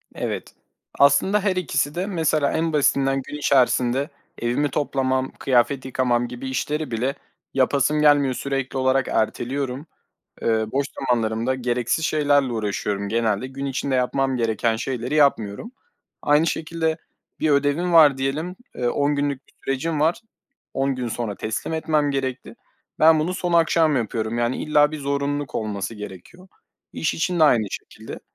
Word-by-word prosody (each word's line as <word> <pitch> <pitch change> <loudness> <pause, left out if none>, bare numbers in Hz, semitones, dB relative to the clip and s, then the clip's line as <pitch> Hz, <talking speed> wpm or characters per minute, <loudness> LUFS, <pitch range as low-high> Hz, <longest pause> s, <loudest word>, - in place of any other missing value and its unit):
Evet, - - -4 0.4
aslında 190 +9 +4
her 190 -3 +1
ikisi 145 -4 -1
de 180 +2 -1
mesela 160 -6 +1
en 160 0 -1
basitinden 135 -2 +2
gün - - -6
içerisinde 130 0 +2 0.3
evimi 125 +5 0
toplamam, 130 -2 -1
kıyafet 130 +1 +1
yıkamam 120 -2 0
gibi 125 +2 -6
işleri 150 +2 -2
bile 125 +5 -1 0.4
yapasım 140 +3 +2
gelmiyor, 145 -3 +4
sürekli 135 0 -3
olarak 130 0 +2
erteliyorum. 130 +5 -2 0.6
Eee, - - 0 0.2
boş 140 +1 0
zamanlarımda 115 0 0
gereksiz 125 +4 -1
şeylerle 145 -5 +2
uğraşıyorum 100 -2 -2
genelde. 115 +1 0
Gün 135 +1 -6
içinde 135 0 -2
yapmam 130 +1 +1
gereken 115 -1 0
şeyleri 125 +3 -3
yapmıyorum. 140 - +1 0.5
Aynı 150 +2 +3
şekilde 160 0 -1 0.4
bir 155 - +2
ödevim 145 +5 +1
var 150 -5 +7
diyelim, 155 +7 -2 0.2
eee, 120 -1 -1
10 145 +3 +1
günlük 140 -2 -2
bir - - -26
sürecim 150 +3 -1
var. 165 +8 +2 0.5
10 135 0 0
gün 125 -2 -3
sonra 110 -3 -3
teslim 110 +10 -4
etmem 155 -2 +1
gerekti. 130 -2 -3 0.4
Ben 160 0 +6
bunu 180 +4 -1
son 175 -2 -2
akşam 165 -3 +3
yapıyorum 115 0 -2
yani 120 +1 0
illa 150 -1 +3
bir 155 - -5
zorunluluk 140 0 -2
olması 105 0 -3
gerekiyor. 105 - -11 0.4
İş 160 - -1
için 175 +1 -1
de - - +7
aynı 115 -7 +4
şekilde. - - -8
135 Hz, 145 wpm, -23 LUFS, 125-150 Hz, 0.6 s, var